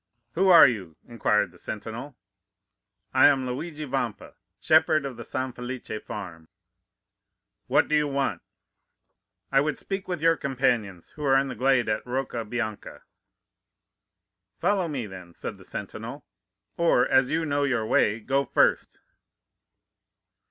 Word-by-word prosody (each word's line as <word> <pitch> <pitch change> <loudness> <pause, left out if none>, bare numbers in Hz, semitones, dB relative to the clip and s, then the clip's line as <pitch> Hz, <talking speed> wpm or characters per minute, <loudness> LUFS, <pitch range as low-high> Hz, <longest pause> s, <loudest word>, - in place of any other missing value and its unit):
"'Who 190 +3 +2
are 175 - +10
you?' 95 -10 -4
inquired 110 -3 +1
the - - -18
sentinel. 115 +6 -7 1.0
"'I - - +7
am 135 -3 +2
Luigi 150 +4 -5
Vampa, 125 -5 -3 0.3
shepherd 155 -2 +3
of 135 -2 -5
the 120 - -8
San 130 0 -3
Felice 125 +1 -7
farm.' 85 -6 -8 1.2
"'What 130 - +3
do - - -3
you 150 -1 +3
want?' 135 -10 -1 1.1
"'I 135 0 +4
would 150 +1 -1
speak 195 -1 -4
with 180 -2 -3
your 165 +1 +4
companions 120 - -1
who 150 - -10
are 135 -1 +4
in 135 0 +1
the 130 - -5
glade 130 +1 +2
at 105 - -1
Rocca 125 -2 -3
Bianca.' 110 -1 -5 1.5
"'Follow 195 -4 +1
me, 140 -7 -3
then,' 90 -4 -11
said - - -7
the - - -15
sentinel; - - -7 0.5
'or, 165 -7 +3
as 130 -1 +3
you 165 0 0
know 145 -1 0
your 125 -6 0
way, 110 0 +2
go 135 +5 0
first. - - +1
130 Hz, 140 wpm, -26 LUFS, 115-145 Hz, 1.5 s, are